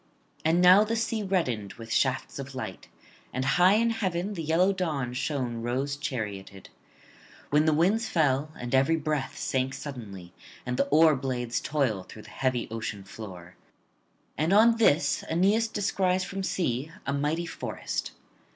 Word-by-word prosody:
And 165 +3 +3
now 185 +3 +8
the 225 +2 -1
sea 225 -1 -1
reddened 125 - -1
with 115 -1 -7
shafts 130 +1 0
of 135 0 -7
light, 95 -8 -6 0.4
and 130 +1 -2
high 180 +8 +5
in 230 +1 +2
heaven 195 -3 -2
the 170 - -4
yellow 165 +5 +2
dawn 150 -10 -2
shone 125 -3 -2
rose 130 +4 -1
charioted; 105 -8 -5 0.8
when 150 +2 +4
the 155 - +3
winds 205 +8 +2
fell, 150 -2 +1
and 120 +1 -5
every 135 +5 +4
breath 150 -3 -2
sank 130 0 -1
suddenly, 100 - -8 0.3
and 125 0 -2
the - - +2
oar 155 0 +5
blades 125 -3 -2
toil 135 -10 0
through 105 +3 -12
the - - -14
heavy 130 -2 -1
ocean 110 -3 -4
floor. 95 -3 -10 0.8
And 160 +3 +1
on 225 +3 +6
this 180 -8 +3
Aeneas 200 +7 +3
descries 190 -3 0
from 195 +1 -5
sea 155 -6 -1
a 140 - -1
mighty 150 +4 -1
forest. - - -4
145 Hz, 155 wpm, -27 LUFS, 125-180 Hz, 0.8 s, now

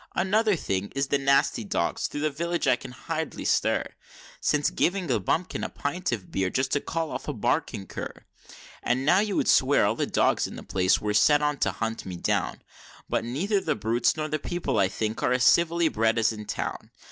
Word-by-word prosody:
Another 205 +3 +2
thing 100 - -3
is 135 0 -1
the 140 - +2
nasty 135 -4 +2
dogs 85 -4 -1
thro' 145 - -5
the 155 0 +1
village 170 +3 -2
I - - +6 0.2
hardly 160 +5 -5
can - - -9
stir - - +2 0.5
Since 145 -1 +1
giving 180 -4 0
a 115 - +2
bumpkin 165 - -1
a - - -2
pint 175 +4 -3
of 105 -6 -4
beer 95 -1 0
just 130 +6 -1
to 145 - +1
call 165 -1 -3
off - - -6
a 150 - -2
barking 120 -3 -1
cur; - - -8 0.6
And 130 +2 0
now 180 +6 +5
you 205 -2 0
would - - +1
swear 135 -4 +4
all 100 - +2
the - - -2
dogs - - +2
in - - -9
the - - -8
place 90 0 +2
were 105 0 -2
set 145 +7 +4
on 150 -1 0
to - - +2
hunt 115 -2 -4
me 90 - -5
down, 85 - -1 0.5
But - - 0
neither 190 - 0
the - - -1
brutes 115 +7 +1
nor 155 0 -2
the 155 0 -2
people 175 -9 -2
I 95 - +4
think 110 +3 -3
are 125 - +2
as 125 0 +1
civilly 170 +2 +4
bred 115 -4 +1
as 110 -1 +3
in 105 -1 -7
town. - - -4
135 Hz, 215 wpm, -26 LUFS, 110-165 Hz, 0.6 s, I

